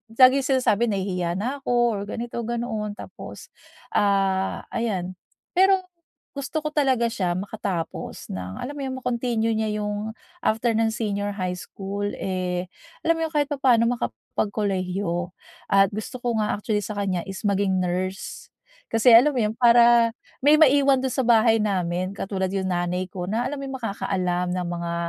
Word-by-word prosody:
laging 260 +2 +7 0.2
sinasabi, 235 -2 +2
"Nahihiya 185 -4 -1
na 250 +8 -2
ako." 240 -5 +1
Or - - -4
ganito, 235 +2 -5
ganoon. 220 -3 -3
Tapos - - -10 0.4
ah 195 -2 +1
ayan. 185 -6 -2 0.3
Pero 380 +1 +4 0.5
gusto 290 +2 -4
ko 305 - -2
talaga 260 -6 +2
siya 180 -5 -1
makatapos 195 -3 -4
ng 95 0 -5
alam 270 - -5
mo 290 -1 -7
yung 260 0 -4
ma-continue 235 -2 0
niya 220 0 0 0.2
yung 210 +1 -3 0.2
after 235 -6 +1
ng 225 0 +2
senior 205 -3 -2
high 180 -2 -2
school 200 +2 -5
eh, 180 -1 -3 0.3
alam 330 0 +2
mo 325 - 0
yun, - - -13
kahit 290 0 +1
papaano 260 -5 +3 0.2
makapagkolehiyo. 185 - -2 0.3
At 195 -1 +4
gusto 220 +4 -6
ko 235 -2 0
nga 210 - 0
actually 210 0 -1
sa 210 0 -5
kanya 195 -3 -1
is 195 +2 -7
maging 195 -2 +1
nurse. 185 +2 -3 0.4
Kasi 225 +1 +5
alam 265 +4 +6
mo - - +2
yun, 215 0 0
para 235 0 +6 0.3
may 295 +3 +6
maiwan 280 -2 +5
do'n 260 -1 -2
sa - - +1
bahay 225 -2 +4
namin, 185 -3 -1
katulad 190 -1 -2
yung 195 0 -2
nanay 175 +1 -1
ko 180 0 -6
na 230 +4 0
alam 285 +1 -4
mo - - -5
yung 265 - -4
makakaalam 185 -5 -1
ng 180 0 -2
mga 170 0 -3
210 Hz, 165 wpm, -24 LUFS, 185-240 Hz, 0.5 s, laging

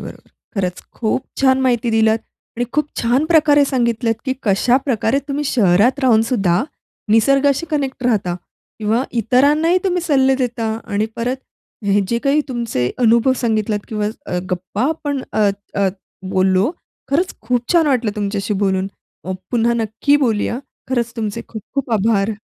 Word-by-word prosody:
बरोबर. - - -8 0.4
खरंच 180 -3 -2 0.2
खूप 230 +2 0 0.2
छान 265 -1 +4
माहिती 245 -2 +1
दिल्यात 220 0 +3 0.4
आणि 245 - 0
खूप 300 0 0
छान 245 +6 +2
प्रकारे 300 -3 +5
सांगितलत 235 -3 0
की 260 - 0
कशाप्रकारे 245 +4 +2
तुम्ही 290 +1 -2
शहरात 220 +2 +3
राहूनसुद्धा, 225 -7 +2 0.5
निसर्गाशी 275 +7 +3
कनेक्ट 275 -4 -2
राहता. 205 -8 +1 0.4
किंवा 220 +3 +1 0.2
इतरांनाही 295 - +3
तुम्ही 360 -1 +1
सल्ले 270 -5 +3
देता 240 -3 -2 0.2
आणि 210 0 -1
परत 245 +3 -1 0.5
हे 200 0 +3
जे 235 - +1
काही 280 +2 +3
तुमचे 230 - -1
अनुभव 235 +2 +4
सांगितलात 220 -3 0
किंवा 210 -1 -2 0.4
गप्पा 185 +5 -3
अ, - - +2
आपण 290 -4 -2
अ, 200 -1 0 0.4
बोललो 190 +6 +2 0.4
खरंच 350 +6 +1
खूप 245 +4 -1
छान 330 -3 +4
वाटलं 250 -6 +1
तुमच्याशी 205 0 -2
बोलून 190 0 +1 0.6
पुन्हा 235 0 +2
नक्की 225 +5 +1
बोलूया. 235 -3 0 0.3
खरंच 240 -2 -1
तुमचे 225 0 -3
खूप 220 -3 -7
खूप 275 -2 -2
आभार. 210 0 +2
235 Hz, 140 wpm, -19 LUFS, 210-270 Hz, 0.6 s, प्रकारे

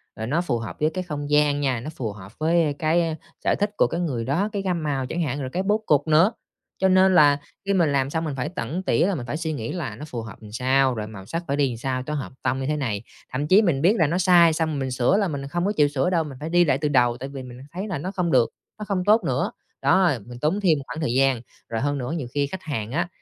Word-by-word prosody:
rồi 110 0 -5
nó 155 +6 +1
phù 135 -9 -1
hợp 110 - -6
với 155 - +2
cái 185 -1 -2
không 145 -4 -5
gian 150 -1 +3
nha, 130 -4 0
nó 130 +7 -6
phù 125 -8 -4
hợp 100 -1 -11
với, 165 +2 +3
a, 150 - +1
cái 165 0 +1 0.3
sở - - +2
thích 205 - +1
của - - +4
cái 170 - -3
người 130 -9 -2
đó, 170 - 0
cái 200 - -1
gam 180 -4 -1
màu 135 -3 -1
chẳng 170 +6 -3
hạn, 145 -3 -2
rồi 130 - -4
cái 185 - 0
bố 210 +2 +1
cục 145 -3 +2
nữa. 165 +7 +5 0.5
Cho 190 - +5
nên 185 0 +5
là 145 -3 +6 0.3
khi 200 - +1
mình 170 -6 +3
làm 135 -1 +1
xong 160 +2 -2
mình 150 -3 -3
phải 135 +3 -2
tẩn 175 +2 -4
tỉa - - +2
là 200 - 0
mình 125 - -5
phải 135 +5 -3
suy 160 -1 -2
nghĩ 115 -5 -4
là 150 -12 -4
nó 150 +8 -8
phù 120 -6 -5
hợp 115 - -9
làm 105 -1 -11
sao, 130 +2 +2
rồi 105 -1 -4
màu 100 -3 -10
sắc 165 - -4
phải 140 - -1
đi 145 -1 +3
làm 115 - -6
sao 130 +1 -2
cho 150 - -4
hợp 145 -3 -4
tông 130 - 0
như 135 - -3
thế 150 - 0
này. 110 -7 -2 0.3
Thậm 140 +4 -2
chí 190 +6 +6
mình 165 -10 +1
biết 190 +7 +4
là 160 - +3
nó 170 +4 0
sai, 175 -3 +6
xong 155 -2 -1
mình 135 -1 -2
sửa 125 +9 +2
là 200 -2 +2
mình 140 -3 -4
không 175 +5 -1
có 205 - +2
chịu 145 -1 +5
sửa 145 +5 0
đâu, 170 -3 +2
mình 140 -4 -8
phải 155 +2 -5
đi 175 0 +4
lại 135 -3 +2
từ 150 +1 -1
đầu 120 -4 +3
tại 135 +2 -6
vì 135 -2 -7
mình 125 0 -10
thấy 190 +4 -4
là 185 - -3
nó 180 +7 -4
không 180 -4 -1
được, 125 -3 +4 0.3
nó 210 - -5
không 195 -3 -1
tốt 215 +2 +5
nữa! - - 0 0.3
Đó, 185 -2 +4
mình 120 +1 -10
tốn 160 +9 +1
thêm 170 -6 +4
một 140 - -6
khoảng 160 - -6
thời 135 -7 0
gian, 135 -2 +3 0.3
rồi 115 +1 -2
hơn 145 0 0
nữa 125 0 -4
nhiều 155 -7 -3
khi 145 -1 +1
khách 185 +5 -7
hàng 115 -8 -4
á, 170 +6 0
150 Hz, 300 wpm, -24 LUFS, 130-175 Hz, 0.5 s, là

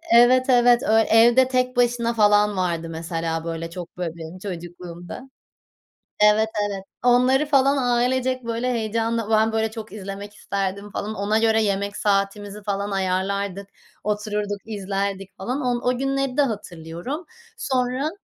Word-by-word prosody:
evet, 250 +2 +6
evet, 245 0 +5
öy 225 -4 +4
Evde 240 +3 +6
Tek 255 0 0
Başına, 240 -1 +2
falan, 210 -2 +3
vardı, 170 -2 -1
mesela, 165 0 -3
böyle, 165 0 -4
çok 175 +1 -9
böy 180 - -2
benim 165 +2 -9
çocukluğumda. 175 +4 -8 0.9
Evet, 210 +1 +4 0.2
evet, 195 -1 -5 0.2
onları, 250 +3 +4
falan, 275 -1 +3
ailecek, 255 0 +1
böyle, 235 +2 -1
heyecanla 225 -1 -1
ben, 220 0 +3
böyle, 220 0 0
çok 220 -1 -8
izlemek 200 0 -7
isterdim, 200 0 -3
falan, 215 +2 -4
ona 205 +2 +1
göre 225 0 +3
yemek 200 0 -1
saatimizi, 205 0 -1
falan, 200 0 -2
ayarlardık 195 +1 -1 0.4
otururduk 210 -1 -2
izlerdik, 195 -2 -4
falan, 250 +9 -3
o 245 -2 -1
o 250 - 0
günleri 270 0 -1
de - - +5
hatırlıyorum 205 - -4 0.3
sonra. 255 +2 -1
210 Hz, 140 wpm, -23 LUFS, 195-245 Hz, 0.9 s, evet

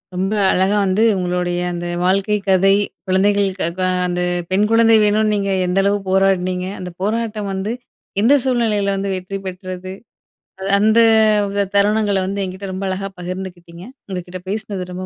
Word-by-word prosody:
ரொம்ப 190 +3 -1 0.2
அழகா 190 +3 +2
வந்து 190 +4 +2
உங்களுடைய 180 -1 -1
அந்த 175 0 -4 0.2
வாழ்க்கை 195 +3 +2
கதை. 195 +1 +4 0.3
குழந்தைகளுக்கு, 195 0 +1
க - - 0 0.3
அந்த 180 0 -2 0.3
பெண் 200 +3 +3
குழந்தை 225 0 +5
வேணுன்னு 215 +1 +2
நீங்க 200 -1 -1 0.2
எந்த 180 +2 +1
அளவு 200 +1 +1
போராடுனீங்க? 185 -1 +1
அந்த 180 -1 -6
போராட்டம் 215 0 -2
வந்து 195 +4 -3 0.5
எந்த 235 +6 +5
சூழ்நிலையில 215 -6 +1
வந்து 195 0 -2
வெற்றி 185 +2 -5
பெற்றது? 185 0 -7 0.7
அது 190 - -5
அந்த 220 +2 +4 0.5
வித 200 0 0
தருணங்கள 205 0 +2
வந்து 200 +1 -3
என்கிட்ட 190 +2 -7
ரொம்ப 195 +1 -4
அழகா 195 +1 -3
பகிர்ந்துக்கிட்டீங்க. 180 -1 -7 0.2
உங்க 185 -2 -3
கிட்ட 180 0 -8
பேசினது 200 -3 -4
ரொம்ப 185 +1 -5
195 Hz, 150 wpm, -19 LUFS, 185-205 Hz, 0.7 s, குழந்தை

